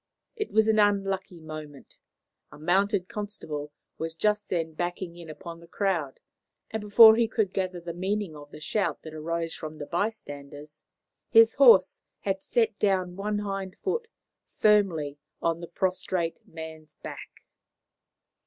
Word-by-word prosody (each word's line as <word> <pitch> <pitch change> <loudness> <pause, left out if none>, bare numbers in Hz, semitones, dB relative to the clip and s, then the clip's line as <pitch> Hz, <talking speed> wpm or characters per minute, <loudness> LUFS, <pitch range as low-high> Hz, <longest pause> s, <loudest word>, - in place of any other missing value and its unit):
It 425 - -4
was 220 0 +4
an 220 -1 +4
unlucky 195 -3 +1
moment. 155 -3 -10 0.5
A - - -12
mounted 185 +4 +1
constable 160 -9 -5 0.3
was 165 0 -4
just 210 +4 0
then 165 -2 -1
backing 175 +1 -4
in 170 -2 -11
upon 165 +2 -9
the 170 - -15
crowd, 170 -8 -1 0.5
and 220 - -3
before 220 +2 +9
he 230 -1 +3
could 215 -4 0
gather 185 -2 -2
the 170 0 -6
meaning 190 -1 -2
of 145 -1 -11
the 150 - -11
shout 205 +6 -1
that 160 - -9
arose 165 +1 -3
from 155 -1 -7
the 145 - -6
bystanders, 150 -6 -5 0.5
his 225 0 +7
horse 235 -9 +6 0.2
had 195 -1 -1
set 225 -1 0
down 185 -3 +1
one 205 +2 -2
hind 195 -2 -4
hoof 455 +5 -1 0.5
firmly 170 -9 +3 0.2
on 165 0 0
the 170 - -6
prostrate 180 -1 -1
man's 160 -1 -10
back. - - -10
180 Hz, 145 wpm, -27 LUFS, 160-205 Hz, 0.5 s, before